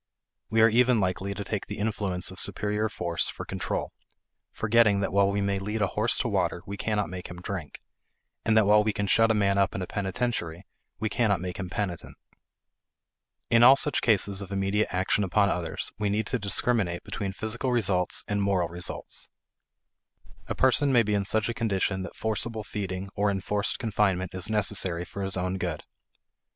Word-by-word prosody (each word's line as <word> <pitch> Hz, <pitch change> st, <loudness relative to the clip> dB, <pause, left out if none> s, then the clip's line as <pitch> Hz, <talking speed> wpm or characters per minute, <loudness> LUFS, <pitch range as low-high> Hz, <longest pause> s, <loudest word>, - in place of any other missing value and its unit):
We 110 Hz, +1 st, +3 dB
are -, -, +8 dB
even 120 Hz, +1 st, +4 dB
likely 95 Hz, +1 st, -1 dB
to 100 Hz, -, -4 dB
take 100 Hz, +1 st, -4 dB
the 105 Hz, -, -6 dB
influence 100 Hz, -4 st, -2 dB
of 95 Hz, -, -9 dB
superior 105 Hz, +2 st, 0 dB
force 85 Hz, -5 st, -1 dB
for -, -, -7 dB
control, -, -, -3 dB, 0.6 s
forgetting 110 Hz, -2 st, +3 dB
that 100 Hz, -, -2 dB
while 100 Hz, 0 st, +4 dB
we 100 Hz, 0 st, 0 dB
may 100 Hz, 0 st, 0 dB
lead 105 Hz, +2 st, -2 dB
a 95 Hz, -, -1 dB
horse -, -, +2 dB
to -, -, 0 dB
water 85 Hz, -, -1 dB
we 100 Hz, -, -5 dB
cannot 105 Hz, 0 st, -1 dB
make 90 Hz, -1 st, -7 dB
him 90 Hz, +1 st, -9 dB
drink; 90 Hz, -4 st, -6 dB, 0.6 s
and 110 Hz, 0 st, +3 dB
that 110 Hz, -, +5 dB
while 105 Hz, +1 st, +5 dB
we 105 Hz, 0 st, 0 dB
can 100 Hz, -, -1 dB
shut 115 Hz, +3 st, +4 dB
a 110 Hz, -, +3 dB
man 100 Hz, -1 st, +2 dB
up 100 Hz, -, +1 dB
in 95 Hz, -, -3 dB
a -, -, -3 dB
penitentiary 95 Hz, -4 st, -3 dB, 0.3 s
we 110 Hz, -, -1 dB
cannot 105 Hz, -3 st, +1 dB
make 90 Hz, 0 st, -5 dB
him 95 Hz, -2 st, -5 dB
penitent. 90 Hz, -2 st, -4 dB, 1.3 s
In 115 Hz, 0 st, +6 dB
all 130 Hz, +3 st, +9 dB
such 145 Hz, 0 st, +1 dB
cases 100 Hz, -3 st, +2 dB
of 100 Hz, 0 st, -8 dB
immediate 100 Hz, +2 st, +1 dB
action 95 Hz, +3 st, +1 dB
upon 100 Hz, +2 st, +2 dB
others, 85 Hz, -2 st, -3 dB
we 105 Hz, -1 st, 0 dB
need 105 Hz, +2 st, 0 dB
to 125 Hz, -, -1 dB
discriminate 100 Hz, -3 st, 0 dB
between 100 Hz, -3 st, -4 dB
physical 110 Hz, +6 st, -2 dB
results 95 Hz, -7 st, 0 dB
and 105 Hz, 0 st, 0 dB
moral 95 Hz, -4 st, +1 dB
results. 85 Hz, +1 st, -5 dB, 1.2 s
A -, -, -3 dB
person 135 Hz, +2 st, +4 dB
may 120 Hz, -3 st, +5 dB
be 105 Hz, -1 st, -1 dB
in 100 Hz, -1 st, +1 dB
such 110 Hz, +1 st, +1 dB
a 120 Hz, -, -1 dB
condition 100 Hz, -4 st, -1 dB
that 95 Hz, -, -7 dB
forcible 110 Hz, 0 st, -1 dB
feeding 100 Hz, -2 st, -5 dB
or 105 Hz, 0 st, +1 dB
enforced 100 Hz, +1 st, -1 dB
confinement 100 Hz, -6 st, 0 dB
is 95 Hz, +1 st, -1 dB
necessary 95 Hz, -5 st, +1 dB
for 100 Hz, -, -7 dB
his 95 Hz, -1 st, 0 dB
own 90 Hz, +1 st, -2 dB
good. 85 Hz, -4 st, -3 dB
100 Hz, 190 wpm, -27 LUFS, 95-110 Hz, 1.3 s, all